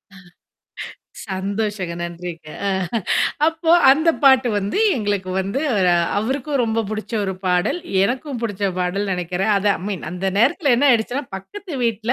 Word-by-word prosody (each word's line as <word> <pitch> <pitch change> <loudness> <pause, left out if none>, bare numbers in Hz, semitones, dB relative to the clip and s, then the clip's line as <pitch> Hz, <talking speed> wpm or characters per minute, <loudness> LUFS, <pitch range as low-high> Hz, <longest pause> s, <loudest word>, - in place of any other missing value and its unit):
ஆ, - - -14 1.1
சந்தோஷங்க. 195 -1 -3
நன்றிங்க. 170 -2 -7 0.2
ஆ, - - +2 0.8
அப்போ 325 0 0 0.2
அந்த 315 +5 +4
பாட்டு 265 -2 +6
வந்து 200 - -2 0.2
எங்களுக்கு 205 -4 -2
வந்து, 200 +8 -2 0.6
அவருக்கும் 265 +5 -1
ரொம்ப 225 -1 0
புடிச்ச 215 +2 -5
ஒரு 190 - -2
பாடல், 180 - +1 0.2
எனக்கும் 255 +3 -2
புடிச்ச 205 -3 -1
பாடல், 190 +3 -1
நெனைக்கிறேன். 180 +4 -1
அத 200 - -1
அ - - -11
மீன் 195 -7 -4
அந்த 180 +2 -4
நேரத்தல 275 - +3
என்ன 285 +4 +3
ஆயிடுச்சுன்னா, 245 +4 +1
பக்கத்து 360 - -9
வீட்ல 230 0 0
215 Hz, 140 wpm, -20 LUFS, 190-265 Hz, 1.1 s, பாட்டு